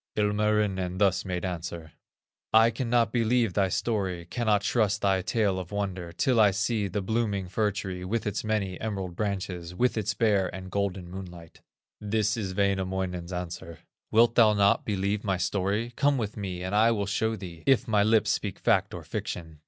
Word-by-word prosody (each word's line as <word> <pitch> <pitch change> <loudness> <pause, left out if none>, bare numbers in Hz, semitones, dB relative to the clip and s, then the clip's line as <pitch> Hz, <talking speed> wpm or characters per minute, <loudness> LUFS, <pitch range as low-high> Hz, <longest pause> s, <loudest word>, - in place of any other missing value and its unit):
Ilmarinen 105 -3 +1
thus 95 -2 +2
made 90 -1 -3
answer: 85 -2 -5 0.6
"I 115 +1 +6
cannot 120 -1 +1
believe 115 -3 +2
thy 95 -1 +2
story, 95 -6 -1
Cannot 105 +1 0
trust 110 -3 +1
thy 95 -2 +3
tale 100 -1 0
of 90 0 -8
wonder, 95 -4 -3
Till 120 +7 +1
I 105 -2 +7
see 105 +2 0
the 100 +1 -3
blooming 105 -3 -1
fir 105 +3 +1
tree, 95 -3 -5
With 110 +5 -2
its 105 - -2
many 105 -4 -2
emerald 95 -5 -4
branches, 95 -4 -3
With 125 +2 +1
its 105 -1 -2
Bear 100 -3 +2
and 95 0 -8
golden 95 -2 -2
moonlight." 90 -2 -10 0.4
This 105 +1 0
is 95 -5 -4
Wainamoinen's 95 -3 -1
answer: 85 -2 -6 0.3
"Wilt 115 +1 +4
thou 110 -3 +6
not 100 0 +3
believe 100 0 -1
my 95 -3 0
story? 100 +6 -1
Come 145 -1 +2
with 105 -4 -3
me 95 -4 -5
and 95 +2 -4
I 110 +2 +5
will 105 -3 0
show 110 +3 0
thee 85 -6 -9
If 135 -1 +4
my 105 -3 +3
lips 110 +1 +3
speak - - -2
fact - - +1
or - - -7
fiction." 80 -3 -6
100 Hz, 175 wpm, -27 LUFS, 95-110 Hz, 0.6 s, I